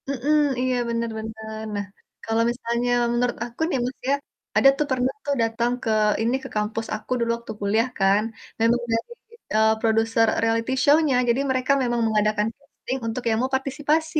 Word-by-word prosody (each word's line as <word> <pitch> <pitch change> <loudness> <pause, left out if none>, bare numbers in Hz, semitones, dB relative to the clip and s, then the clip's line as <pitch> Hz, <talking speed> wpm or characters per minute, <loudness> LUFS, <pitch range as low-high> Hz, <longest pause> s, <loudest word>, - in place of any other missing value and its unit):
Mhm. 280 +2 0 0.3
Iya, 255 0 +1
bener 230 0 -1
bener. 220 0 -6
Nah, 205 0 -2 0.4
kalo 225 0 0
misalnya 240 0 -2 0.2
menurut 240 0 0
aku 240 +4 -10
nih, 310 - 0
Mas, 255 +1 -5
ya, 280 - +4 0.4
ada 275 - +7
tuh 300 - +1
pernah 255 0 +1
tuh 285 -1 0
dateng 230 +1 0
ke - - -1 0.3
ini, 235 +3 +1
ke - - -7
kampus 215 +2 -2
aku 215 +3 -10
dulu 235 0 0
waktu 235 -1 -8
kuliah 215 +4 +2
kan, 195 +2 +4 0.4
memang 235 +2 +3
dari, 230 - -1 0.4
eee, 220 0 +5
produser 225 0 +2 0.2
reality 230 +2 +1
show-nya. 295 -2 +4
Jadi 235 +3 +2
mereka 255 +1 +1
memang 240 -1 0
mengadakan 215 -1 +1
casting 275 -2 -6
untuk 225 +3 -3
yang 220 - +2
mau 260 +1 -1
partisipasi. 295 +4 0
235 Hz, 175 wpm, -24 LUFS, 220-260 Hz, 0.4 s, ada